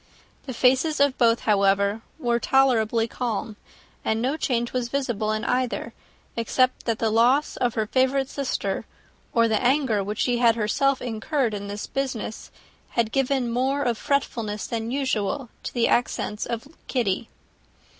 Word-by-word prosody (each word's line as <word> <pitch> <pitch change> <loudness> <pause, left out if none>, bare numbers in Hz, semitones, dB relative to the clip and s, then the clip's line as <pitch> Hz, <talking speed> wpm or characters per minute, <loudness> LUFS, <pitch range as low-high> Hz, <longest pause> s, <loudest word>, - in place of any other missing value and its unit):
The 260 - -4
faces 265 +6 +3
of 280 -2 +3
both, 230 -1 +4
however, 200 0 +2 0.2
were 240 -5 0
tolerably 235 -4 +3
calm; 225 -2 -3 0.5
and 220 - 0
no 260 +5 0
change 240 -6 -1
was 250 -2 -1
visible 240 -6 -1
in 215 +1 -2
either, 250 0 -1 0.4
except 255 +2 +1
that 230 -2 +1
the 225 -1 0
loss 245 +7 +3
of 245 -2 0
her 220 - +1
favourite 260 +3 +1
sister, 275 -1 -2 0.5
or 230 -1 +3
the 220 -1 +1
anger 250 -5 +2
which 205 +2 -4
she 245 -1 +1
had 230 -2 +5
herself 265 +5 +1
incurred 240 +1 -1
in 200 -1 -5
the 205 +1 -5
business, 255 -5 -3 0.4
had 230 -3 0
given 270 0 +1
something 235 -1 -3
more 265 +3 +1
of 240 -2 +1
fretfulness 225 -5 -1
than 225 -1 -3
usual 260 -2 -1
to - - -5
the 235 -2 +2
accents 215 -3 0
of 235 +2 -4 0.2
Kitty. 230 -3 -1
235 Hz, 155 wpm, -24 LUFS, 220-265 Hz, 0.5 s, had